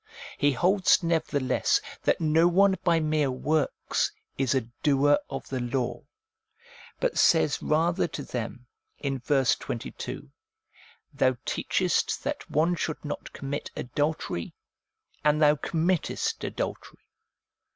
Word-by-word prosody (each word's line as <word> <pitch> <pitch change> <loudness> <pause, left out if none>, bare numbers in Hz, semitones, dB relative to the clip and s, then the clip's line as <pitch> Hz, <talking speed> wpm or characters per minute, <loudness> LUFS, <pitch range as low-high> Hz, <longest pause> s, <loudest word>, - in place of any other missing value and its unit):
He 145 -1 +2
holds 185 +6 +3
nevertheless 160 -5 +1 0.3
that - - +3
no 160 +1 +4
one 190 +2 +4
by 170 -2 +3
mere 155 -2 +1
works 145 +4 0 0.2
is 135 -1 +1
a 130 - +3 0.2
doer 145 0 +4
of 135 -1 -6
the 130 - -2
law, 120 0 -2 1.0
but - - 0
says 160 -3 +4
rather 165 +4 +1
to 150 -2 -6
them 125 0 -5 0.3
in 135 -2 -3
verse 135 0 +2
22, 115 - -6 0.4
' - - -27
Thou 130 -1 +2
teachest - - 0
that - - -4
one 160 +4 +2
should 160 -3 -3
not 145 - -5
commit 140 +1 -5
adultery, 145 - -2 0.7
and 150 0 +3
thou 150 -1 +6
committest 165 +3 -1
adultery.' - - -5
150 Hz, 120 wpm, -27 LUFS, 135-165 Hz, 1.0 s, thou